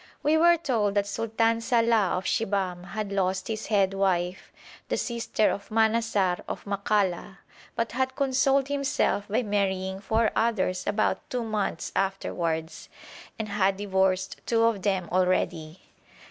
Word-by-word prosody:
We 300 +2 +3
were 340 +2 +5
told 230 -10 0
that 200 -1 +2
Sultan 225 +2 0
Salàh 230 -4 +2
of 185 - -3
Shibahm 190 -4 -1
had 200 +2 -5
lost 190 -1 0
his 220 -1 -4
head 195 -3 +2
wife, 185 -2 -1 0.4
the - - 0
sister 235 -3 0
of 200 0 -6
Manassar 220 -4 +2
of - - -6
Makalla, 200 -2 -1 0.4
but 230 0 -1
had 260 +1 -1
consoled 270 0 +2
himself 275 -7 0
by 220 +4 0
marrying 190 -2 -1
four 220 +3 +1
others 190 -5 0
about 205 +1 0
two 250 -2 -2
months 210 -6 -2
afterwards, 170 -4 -2 0.5
and 220 - -3
had 195 -1 +1
divorced 190 -1 0
two 230 -1 +2
of 230 -4 +2
them 190 -3 0
already. 180 -2 0
205 Hz, 140 wpm, -26 LUFS, 190-230 Hz, 0.5 s, were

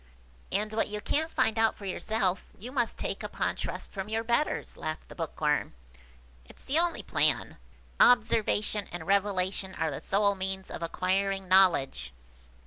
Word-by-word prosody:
And 215 +1 -1
what 220 - +1
you 210 0 -4
can't 315 +9 0
find 225 -7 +1
out 225 0 +3
for 200 - -10
yourself, 195 -1 -1
you 240 +6 -8
must 240 -4 0
take - - -3
upon - - -2
trust - - -5
from 195 0 -5
your 225 +1 -1
betters," 235 +6 0
laughed 155 0 -5
the - - -9
Bookworm. 150 - -1 0.7
"It's - - -13
the 290 +4 +2
only 345 0 0
plan. - - +2 0.4
Observation 215 -3 +3
and 175 -2 -6
Revelation 190 -1 0
are 160 -1 -1
the 135 - -5
sole 200 +1 +2
means 190 0 -4
of - - -6
acquiring 190 +3 0
knowledge." 180 - +3
200 Hz, 155 wpm, -29 LUFS, 185-220 Hz, 0.7 s, out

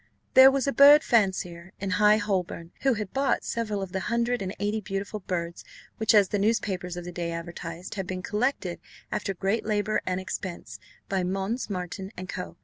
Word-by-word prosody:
There 260 +1 +10
was 270 -1 0
a 275 - 0
bird 290 +2 +8
fancier 185 -5 0
in 195 -1 -3
High 210 +3 +5
Holborn, 185 -5 -2
who 270 -3 +3
had 210 -3 -5
bought 270 0 +1
several 215 -4 -2
of 190 - -7
the 190 - -2
hundred 235 0 0
and 190 -1 -3
eighty 210 +2 -1
beautiful 200 +1 -4
birds, 170 -3 -4 0.3
which, 220 0 +3
as 200 -3 +5
the 205 - 0
newspapers 190 -4 0
of 175 - -6
the 180 - -6
day 170 -1 -3
advertised, 170 +1 -6
had 195 -3 -4
been 185 -1 -4
"collected, 210 -5 -1 0.3
after 200 -2 -2
great 195 +5 0
labour 215 0 0
and 185 0 0
expense, 185 -1 -6 0.3
by 195 -1 0
Mons. 195 +7 -2
Marten 190 +1 -5
and 185 +1 -6
Co. 180 - -6
195 Hz, 190 wpm, -27 LUFS, 180-215 Hz, 0.3 s, There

